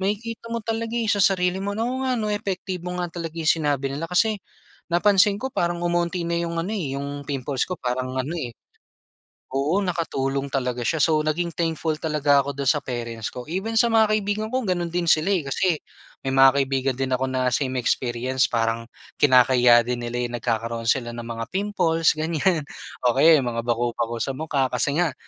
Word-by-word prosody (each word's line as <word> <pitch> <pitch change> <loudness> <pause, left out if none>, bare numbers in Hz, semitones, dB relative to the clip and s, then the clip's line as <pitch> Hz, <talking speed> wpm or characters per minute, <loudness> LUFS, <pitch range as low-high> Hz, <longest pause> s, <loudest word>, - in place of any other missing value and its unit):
makikita 220 +4 -3
mo 235 - -1
talaga 225 +1 -3
eh 230 - -1
sa 205 -2 +2
sarili 180 -1 +2
mo 200 - -2
oo 240 +3 -1
nga 260 -1 +1 0.2
epektibo 185 -3 -4
nga 175 - -1
talaga 165 -1 -6
'yong 160 -1 +2
sinabi 140 -2 0
nila 165 +4 -4
kasi 215 +4 +2 0.5
napansin 200 +3 +4
ko 265 - -2
parang 175 0 0
umunti 175 +1 0
na 170 - -1
'yong 170 0 -2
ano - - -4
'yong 140 -4 -4
pimples 135 -1 -2
ko 185 - -3
parang 130 +1 -3
ano 140 +6 -2
eh. 125 -6 -4 1.0
Oo 140 +7 +1
nakatulong 140 -6 -2
talaga 125 -2 -2
siya 160 - +1
so 155 -1 +3
naging 170 +3 0
thankful 165 -1 -1
talaga 145 -3 +3
ako 140 +1 -4
do'n 140 -1 0
sa 150 -2 +2
parents 115 -3 -4
ko, 125 +4 -8
even 195 +6 -3
sa 235 +1 +4
mga 220 -1 +4
kaibigan 215 +1 -1
ko 260 - +1
gano'n 175 -3 -1
din 175 -1 0
sila 155 +5 +3
eh. 185 - +1
Kasi 180 +5 +2 0.5
may 135 - -3
mga 135 0 +8
kaibigan 135 -1 0
din 135 0 -1
ako 130 - -1
na 130 -1 +1 1.0
parang 115 0 0 0.3
kinakahiya 125 -3 +6
din 120 0 -3
nila 120 0 -2
nagkakaroon 115 0 -2
sila 120 0 +1
ng 120 - -6
mga 115 -1 -4
pimples 180 -5 +1
ganyan 160 +2 0 0.4
o 120 - +4
kaya 155 +1 +6
mga 120 -2 -2
bakobako 120 -1 -1
sa 135 -1 -2
mukha 140 -4 0
kasi 140 +3 0
nga 165 -6 +1
155 Hz, 180 wpm, -23 LUFS, 130-180 Hz, 1.0 s, mga